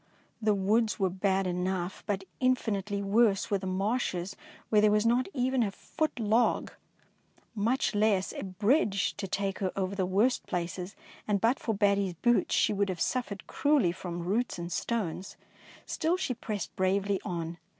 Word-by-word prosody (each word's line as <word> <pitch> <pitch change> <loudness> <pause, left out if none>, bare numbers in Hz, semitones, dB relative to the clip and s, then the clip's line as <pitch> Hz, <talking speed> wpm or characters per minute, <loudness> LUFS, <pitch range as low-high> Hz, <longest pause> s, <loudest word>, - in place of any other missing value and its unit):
The 215 -1 +3
woods 215 +3 +2
were 190 -3 +1
bad 190 +1 +1
enough, 180 0 -2
but 195 -2 -1 0.2
infinitely 210 -6 0
worse 205 0 +2
were 200 - +2
the 190 - -5
marshes 195 -1 -1 0.3
where 210 -1 +5
there 210 - +5
was 210 +1 +2
not 240 +2 +3
even 260 -3 +1
a 215 - +2
foot 310 +8 -3
log, 225 +2 +2 0.8
much 230 +5 +1
less 205 -2 +2
a - - -5
bridge 200 - +1
to 200 -1 -4
take 195 +1 -2
her 190 -2 -1
over 190 0 -1
the 190 -2 -1
worst 210 +7 +1
places, 180 +2 -3 0.3
and 205 -2 +2
but 230 +6 +2
for 225 - -1
Batty^s 200 -3 +2
boots 240 -1 +3
she - - +3
would 200 -1 0
have 180 -2 -3
suffered 215 -5 -2
cruelly 285 - +2
from 175 -1 -5
roots 220 +5 0
and 170 0 -5
stones. 195 -3 -3 0.5
Still 335 +3 0
she 315 -8 -1
pressed 215 -3 -5
bravely 195 +1 +1
on. 170 -1 -4
200 Hz, 165 wpm, -29 LUFS, 190-225 Hz, 0.8 s, where